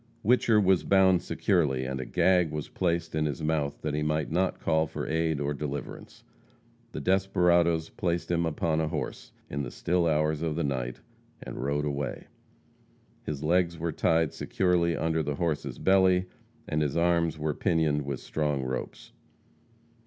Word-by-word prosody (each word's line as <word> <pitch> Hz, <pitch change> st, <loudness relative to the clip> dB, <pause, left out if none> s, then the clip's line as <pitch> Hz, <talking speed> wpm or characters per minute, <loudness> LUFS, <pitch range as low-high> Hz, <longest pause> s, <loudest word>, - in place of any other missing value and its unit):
Whicher 115 Hz, -1 st, +4 dB
was 95 Hz, -3 st, +3 dB
bound 95 Hz, -2 st, +4 dB
securely, 75 Hz, -10 st, 0 dB
and 65 Hz, 0 st, -3 dB
a -, -, -5 dB
gag 90 Hz, -3 st, +3 dB
was 75 Hz, -1 st, -5 dB
placed 85 Hz, -2 st, -1 dB
in 80 Hz, -1 st, 0 dB
his 70 Hz, -1 st, -4 dB
mouth 75 Hz, -2 st, -1 dB
that 75 Hz, -, -2 dB
he 75 Hz, -, -1 dB
might 75 Hz, 0 st, -1 dB, 0.3 s
call 80 Hz, 0 st, +1 dB
for -, -, -5 dB
no -, -, -4 dB
aid 80 Hz, -2 st, 0 dB
or 70 Hz, 0 st, -1 dB
deliverance. 70 Hz, 0 st, -6 dB, 0.7 s
The -, -, -5 dB
desperadoes 85 Hz, -2 st, +2 dB
placed 85 Hz, -1 st, -2 dB
hum 85 Hz, -1 st, +1 dB
upon 80 Hz, 0 st, 0 dB
a 80 Hz, -, 0 dB
horse, -, -, -5 dB, 0.2 s
in 70 Hz, -, -3 dB
the 65 Hz, -, -4 dB
still 85 Hz, +6 st, 0 dB
hours 75 Hz, -1 st, +1 dB
of 80 Hz, -2 st, -1 dB
the 85 Hz, -, -1 dB
night, 65 Hz, -4 st, -3 dB, 0.4 s
and -, -, -7 dB
rode 70 Hz, +2 st, 0 dB
away. 70 Hz, -1 st, -3 dB, 1.0 s
His 75 Hz, -1 st, -4 dB
legs 85 Hz, +1 st, +2 dB
were 85 Hz, +1 st, -2 dB
tied 80 Hz, 0 st, +1 dB
securely 90 Hz, -3 st, +1 dB
under 80 Hz, 0 st, 0 dB
the 75 Hz, -1 st, -2 dB
horse's 80 Hz, -1 st, -2 dB
belly, 95 Hz, -1 st, +3 dB, 0.4 s
and 75 Hz, -, 0 dB
his 75 Hz, 0 st, -1 dB
arms 85 Hz, -2 st, +2 dB
were 75 Hz, 0 st, -1 dB
pinioned 80 Hz, -4 st, +1 dB
with 70 Hz, -2 st, -4 dB
strong 75 Hz, -3 st, -1 dB
ropes. 65 Hz, 0 st, -5 dB
80 Hz, 165 wpm, -28 LUFS, 75-85 Hz, 1.0 s, Whicher